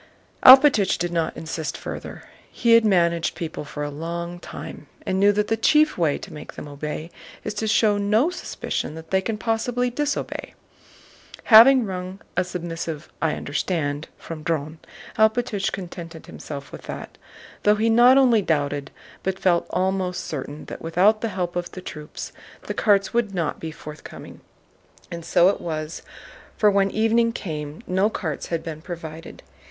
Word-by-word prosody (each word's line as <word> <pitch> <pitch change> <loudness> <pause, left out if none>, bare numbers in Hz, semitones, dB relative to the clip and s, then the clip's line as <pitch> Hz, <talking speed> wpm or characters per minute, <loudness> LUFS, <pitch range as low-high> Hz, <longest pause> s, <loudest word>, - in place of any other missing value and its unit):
Alpátych 260 -6 +8
did 175 0 -2
not 165 -2 -1
insist 160 -1 -4
further. - - -7 0.3
He 235 - +1
had 230 0 +7
managed 170 -5 +2
people 160 -3 -5
for 145 0 -6
a 145 - -3
long 170 +3 -5
time - - -9 0.2
and 190 - 0
knew 200 +1 +6
that 210 +1 0
the 225 - +1
chief 300 +7 +4
way 160 -5 +1
to - - -10
make 150 - -9
them - - -8
obey 150 +3 -6 0.3
is 210 - -3
to 220 +1 -2
show 210 -1 +3
no 215 - +2
suspicion 260 - -4
that 160 0 -11
they 190 0 +3
can 215 +2 -3
possibly 245 +3 -1
disobey. 295 +3 -3 1.0
Having 245 +3 +9
wrung 185 0 -5 0.2
a 180 - +2
submissive 165 -3 -5
"I 160 -2 +1
understand" 145 0 -2
from 160 -2 -8
Dron, 155 0 -2 0.4
Alpátych 220 -2 +2
contented 170 -3 -8
himself 140 -2 -8
with - - -9
that, - - -7 0.4
though 210 0 +4
he 220 +2 +1
not 240 +3 +6
only 245 -5 +5
doubted 145 -5 -1 0.3
but 190 0 -2
felt 175 -3 +2
almost 185 0 -1
certain 145 0 -6
that - - -8
without 190 +7 +3
the 230 - -1
help 180 -3 -3
of 175 0 -3
troops 155 -4 -8 0.3
the - - -4
carts 200 -2 +2
would 225 -4 0
not 170 -4 -1
be 160 - -5
forthcoming. 150 -1 -10 0.7
And 170 -1 -6
so 175 +2 +4
it - - -2
was, 155 -1 -4 0.6
for 210 -1 +5
when 195 0 +3
evening 225 +2 +2
came 150 -6 -6
no 190 +3 +2
carts 160 -9 -4
had 165 -1 -2
been 160 -2 -6
provided. 165 -2 -8
180 Hz, 160 wpm, -23 LUFS, 160-215 Hz, 1.0 s, Having